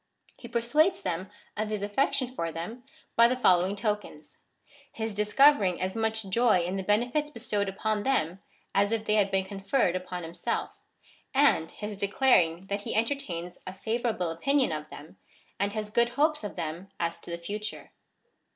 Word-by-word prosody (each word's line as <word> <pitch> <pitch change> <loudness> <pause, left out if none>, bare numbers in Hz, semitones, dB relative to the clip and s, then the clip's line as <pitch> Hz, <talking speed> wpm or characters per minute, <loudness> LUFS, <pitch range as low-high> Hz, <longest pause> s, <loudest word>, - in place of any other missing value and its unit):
^ - - -22
He 235 - -7
persuades 285 +10 +2
them 180 +3 -3 0.3
of 215 0 -2
his 210 -2 -2
affection 255 +4 +1
for 165 -9 -2
them 175 +10 -6 0.3
by 230 0 +7
the 250 - +1
following 185 -5 +3
tokens 205 -7 -4 0.3
— 285 0 -26
his 220 -1 -4
discovering 210 -1 +4
as 185 +2 -2
much 220 -2 0
joy 215 -1 +3
in 180 +2 -2
the 195 - -1
benefits 245 +9 +1
bestowed 210 -6 -2
upon 210 +2 -1
them, 195 -7 0 0.3
as 200 +1 +3
if 225 -1 -1
they 210 - +1
had 205 -2 +3
been 190 -1 +1
conferred 195 0 0
upon 180 -1 -4
himself; 170 +1 -3 0.6
and 275 - +4
his 210 -1 -6
declaring 195 -5 +3
that 200 +1 -3
he - - -4
entertains 185 -8 -2
a 185 - -5
favour 230 +5 -1
able 180 -6 -1
opinion 270 - +1
of 155 -1 -4
them, 150 +3 -12 0.4
and 200 +1 0
has 215 -1 -4
good 235 +2 +3
hopes 300 +2 +1
of 205 - -5
them 165 +5 -5
as 170 0 -2
to - - -11
the 170 - -3
future. 210 +5 -5
210 Hz, 180 wpm, -28 LUFS, 185-235 Hz, 0.6 s, by